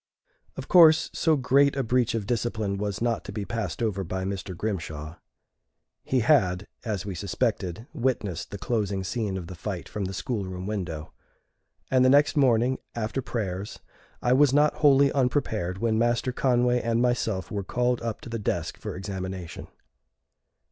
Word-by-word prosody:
Of - - -6
course, 160 -3 +6
so 160 -1 +2
great 140 +1 +3
a 135 - 0
breach 125 0 +1
of 110 -3 -2
discipline 110 -3 -1
was 105 +2 -2
not 120 -2 0
to - - -6
be 100 0 -4
passed 105 +1 -3
over 100 -4 -1
by 95 +2 -3
Mr. 95 -1 -4
Grimshaw. 80 -6 -4 0.9
He 130 -2 +1
had, 105 - +3 0.2
as 105 -6 -3
we 100 - -4
suspected, 100 +1 -2
witnessed 105 -9 -2
the 100 - -6
closing 100 -3 -1
scene 100 -1 -2
of 90 - -6
the 90 - -8
fight 90 0 -5
from 105 -2 -4
the 95 - -4
school 110 +1 -2
room 95 -1 -6
window, 90 -7 -4 0.8
and 130 -1 +5
the 130 - +5
next 145 +2 +5
morning, 130 -2 +3 0.2
after 115 +3 -2
prayers, 100 -5 -4 0.5
I 125 - +3
was 140 0 +5
not 150 +2 +3
wholly 140 -2 +5
unprepared 120 -9 0
when 110 +1 +1
Master 120 +2 +1
Conway 125 -1 +2
and 115 0 0
myself 115 -7 0
were 100 -1 -2
called 125 +5 0
up 115 -2 -4
to - - -9
the 115 0 -3
desk 105 - -2
for - - -5
examination. 95 -2 -6
110 Hz, 170 wpm, -26 LUFS, 95-125 Hz, 0.9 s, course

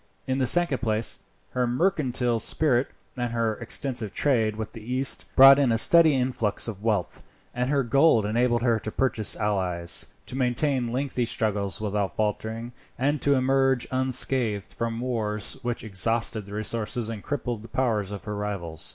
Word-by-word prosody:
In 130 +1 -1
the 130 - +1
second 175 -5 +2
place, 110 -1 0 0.3
her 125 -1 0
mercantile 125 -5 0
spirit, 130 +1 +2 0.3
and 120 -2 -3
her 115 -1 0
extensive 120 -2 -3
trade 115 -7 +1
with 110 -1 -6
the 115 - -10
East, 130 +4 0
brought 135 +1 +9
in 135 -4 +2
a 115 - +2
steady 160 +4 +6
influx 125 -6 0
of 105 -3 -6
wealth, 105 -5 -2 0.3
and 125 +1 -2
her 140 -1 +1
gold 125 -2 +3
enabled 120 +2 +1
her 115 -3 +2
to 110 - -6
purchase 115 -5 0
allies, 90 -5 0 0.2
to - - -7
maintain 130 0 0
lengthy 125 0 -2
struggles 105 -4 -2
without 105 -2 -2
faltering, 110 +2 -3 0.3
and 145 +2 0
to 140 -1 +3
emerge 135 -1 +2
unscathed 130 -5 0
from 115 0 -3
wars 110 -4 -3
which 120 -1 -3
exhausted 110 +1 0
the 100 - -8
resources, 110 +1 -2
and 110 -2 -6
crippled 125 -5 -4
the 115 - -12
powers, 110 -6 -1
of 100 - -7
her 105 - -5
rivals. 100 -6 -4
120 Hz, 165 wpm, -25 LUFS, 105-130 Hz, 0.3 s, brought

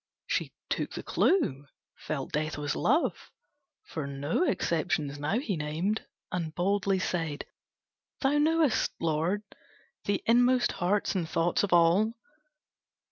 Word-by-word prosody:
She - - -1 0.2
took - - -2
the - - -5
clue, 145 - +1 0.3
felt 140 -3 -4
Death 155 0 -1
was 145 0 -2
Love, 305 +9 +1 0.5
For 160 - -5
no 140 - -1
exceptions 155 - 0
now 150 +9 0
he 235 -7 -1
named, 160 +8 -2 0.2
And 165 -3 -3
boldly 195 +1 +1
said, 165 -5 -2 0.8
"Thou 285 +2 +3
knowest, 315 -3 +2
Lord, 165 +6 0 0.6
The 200 -1 0
inmost 245 +1 +4
hearts 200 +3 0
and 175 -5 -2
thoughts 170 +1 +1
of 205 - -1
all! 175 +7 +4
175 Hz, 125 wpm, -29 LUFS, 155-220 Hz, 0.8 s, inmost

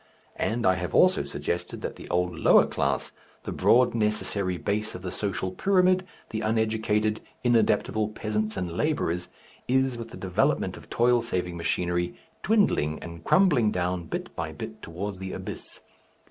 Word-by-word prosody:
And 115 +2 0
I 95 - +6
have 90 -3 -3
also - - +5
suggested 85 - -4
that - - -4
the - - -11
old 90 -1 0
lower - - +6
class, 70 -1 -1 0.3
the - - -5
broad 125 +1 +4
necessary 105 -4 0
base 105 +4 -2
of 90 - -8
the 90 - -4
social 95 -2 -2
pyramid, 185 - +3 0.2
the 110 - -2
uneducated 110 -1 +1 0.2
inadaptable 110 -2 +2
peasants 110 0 -2
and 90 -2 -2
labourers, 90 - 0 0.4
is, 130 -1 +1
with 115 - -6
the 115 - -10
development 90 -2 0
of - - -13
toil 120 0 +3
saving 90 -6 -2
machinery, 85 +1 -1 0.3
dwindling 195 - +2
and 85 0 -9
crumbling 150 - +4
down 90 -2 -1
bit - - -5
by - - -3
bit - - -8
towards 95 +3 -5
the 95 0 -5
abyss. - - -7
105 Hz, 155 wpm, -27 LUFS, 90-115 Hz, 0.4 s, I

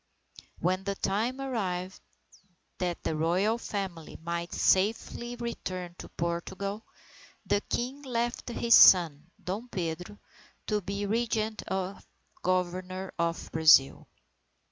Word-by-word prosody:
When 185 +2 0
the 200 0 -2
time 225 +8 -1
arrived, 190 -9 -3 0.8
that 175 -2 -2
the 160 - -1
Royal 185 +8 +1
Family 190 -8 -5
might 170 +1 -3
safely 225 +4 +1
return 185 -7 -5
to - - -8
Portugal, 190 +5 -4 0.6
the 205 - +2
King 260 +4 -2
left 240 -3 -2
his 235 0 +2
son, 165 -6 +7
Dom 210 +7 -4
Pedro, 180 +1 -4 0.5
to 210 -1 0
be 200 +2 -3
Regent 220 0 -1
or 190 0 -2 0.4
Governor 185 +1 -1
of 170 0 -1
Brazil. 160 -4 +5
190 Hz, 110 wpm, -29 LUFS, 175-220 Hz, 0.8 s, son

